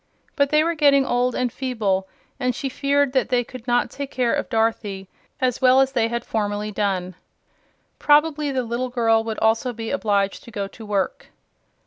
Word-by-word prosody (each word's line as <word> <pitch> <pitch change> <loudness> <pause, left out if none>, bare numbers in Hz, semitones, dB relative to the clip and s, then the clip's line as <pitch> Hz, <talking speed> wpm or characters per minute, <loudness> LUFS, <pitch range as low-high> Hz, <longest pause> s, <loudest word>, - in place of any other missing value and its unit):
But 280 -1 +2
they 305 +1 +4
were 335 +1 0
getting 285 -3 +4
old 245 0 0
and 250 -2 -1
feeble 210 -8 -1 0.3
and 250 -2 0
she 275 - -3
feared 280 0 +1
that 260 - +1
they 250 -1 +2
could 250 0 -11
not 245 0 +1
take 280 -1 -6
care 250 -3 0
of - - -2
Dorothy 220 -4 -1 0.3
as 255 -3 0
well 255 0 +6
as 270 0 +3
they 235 -4 +1
had 235 +1 -4
formerly 210 -1 -2
done. 190 -3 -1 0.9
Probably 300 0 +3
the 260 -2 -1
little 240 +2 -3
girl 225 -2 +2
would 225 -1 -4
also 225 +3 +1
be 225 0 -5
obliged 200 -7 0
to - - -11
go 205 -3 -4
to 220 +3 -12
work. 200 -2 -2
245 Hz, 185 wpm, -22 LUFS, 220-270 Hz, 0.9 s, well